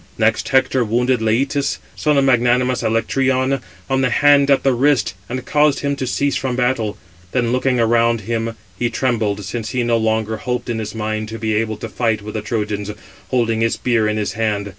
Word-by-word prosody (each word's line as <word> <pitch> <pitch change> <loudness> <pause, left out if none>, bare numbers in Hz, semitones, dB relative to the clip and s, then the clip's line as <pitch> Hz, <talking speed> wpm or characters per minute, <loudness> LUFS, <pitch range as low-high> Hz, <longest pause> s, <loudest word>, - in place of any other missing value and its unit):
Next - - +1
Hector 130 -1 +3
wounded 120 +3 +1
Leïtus, 135 +6 0 0.2
son 150 -1 +1
of 140 - +4
magnanimous 125 -1 +2
Alectryon, 130 +3 +1 0.3
on 135 -1 +1
the 130 - +2
hand 140 +2 +4
at 140 - +4
the 135 - +3
wrist, 130 -4 +2 0.2
and 130 +1 -4
caused 150 -1 +2
him 140 0 0
to 130 - -3
cease 140 +3 0
from 130 -2 -1
battle. 125 -4 0 0.4
Then 120 -2 +1
looking 130 0 +1
around 115 0 +2
him, 115 +2 -3 0.2
he 120 - +1
trembled, 110 -5 -1
since 115 +2 -4
he 125 -2 -1
no 120 -1 +2
longer 110 0 0
hoped 125 +1 -3
in 115 - -2
his 110 0 -5
mind 110 0 -3
[to 115 - -6
be 110 -1 -1
able] 110 0 -1
to - - -6
fight 110 -3 -1
with 105 - -7
the 110 - -3
Trojans, 105 -2 -3 0.4
holding 115 -3 +1
his 115 0 +2
spear 120 -3 +1
in 105 0 -1
his 105 -1 -2
hand. 105 -2 -1
120 Hz, 200 wpm, -19 LUFS, 110-130 Hz, 0.4 s, of